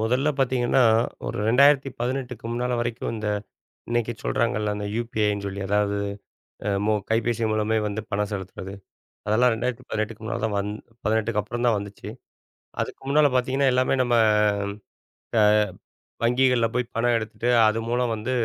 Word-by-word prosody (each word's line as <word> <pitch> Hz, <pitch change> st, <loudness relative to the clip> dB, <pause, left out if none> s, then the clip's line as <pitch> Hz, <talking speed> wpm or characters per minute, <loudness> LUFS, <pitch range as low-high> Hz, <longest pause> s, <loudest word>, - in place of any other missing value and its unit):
முதல்ல 125 Hz, +6 st, +1 dB
பாத்தீங்கன்னா, 130 Hz, -1 st, +2 dB, 0.4 s
ஒரு -, -, -3 dB
2018க்கு 130 Hz, -2 st, +2 dB
முன்னால 125 Hz, +1 st, -1 dB
வரைக்கும், 120 Hz, -1 st, -3 dB
இந்த 105 Hz, -1 st, -3 dB, 0.6 s
இன்னைக்கு 120 Hz, 0 st, 0 dB
சொல்றாங்கல, 105 Hz, -3 st, 0 dB
அந்த 105 Hz, -, -4 dB
UPIன்னு 105 Hz, -3 st, -1 dB
சொல்லி, 100 Hz, 0 st, -5 dB
அதாது 100 Hz, 0 st, +1 dB, 0.7 s
அ -, -, +1 dB, 0.2 s
மொ 110 Hz, -, +3 dB, 0.2 s
கைபேசி 115 Hz, 0 st, +1 dB
மூலமே 110 Hz, +1 st, +1 dB
வந்து 105 Hz, +1 st, -3 dB
பணம் 105 Hz, 0 st, 0 dB
செலுத்துறது. 95 Hz, 0 st, -6 dB, 0.5 s
அதெல்லாம் 120 Hz, +3 st, +4 dB
2018க்கு 115 Hz, -2 st, -3 dB
முன்னால 110 Hz, -, -3 dB
தான் 105 Hz, -2 st, -2 dB
வந் 105 Hz, +1 st, -2 dB, 0.3 s
18க்கு 110 Hz, 0 st, +1 dB
அப்புறம்தான் 120 Hz, +2 st, 0 dB
வந்துச்சு. 100 Hz, 0 st, -7 dB, 0.7 s
அதுக்கு -, -, -4 dB
முன்னால 145 Hz, +1 st, +5 dB
பாத்தீங்கன்னா, 130 Hz, +2 st, +2 dB
எல்லாமே 130 Hz, +1 st, +2 dB
நம்ம 120 Hz, -1 st, +1 dB, 1.3 s
அ -, -, +6 dB, 0.8 s
வங்கிகள்ல 125 Hz, -1 st, +3 dB
போய் 125 Hz, -1 st, -1 dB
பணம் 120 Hz, +1 st, +2 dB
எடுத்துட்டு, 110 Hz, +1 st, -4 dB, 0.2 s
அது 110 Hz, +1 st, 0 dB
மூலம் 120 Hz, -1 st, 0 dB
வந்து 110 Hz, +4 st, -4 dB
115 Hz, 135 wpm, -24 LUFS, 105-125 Hz, 1.3 s, அ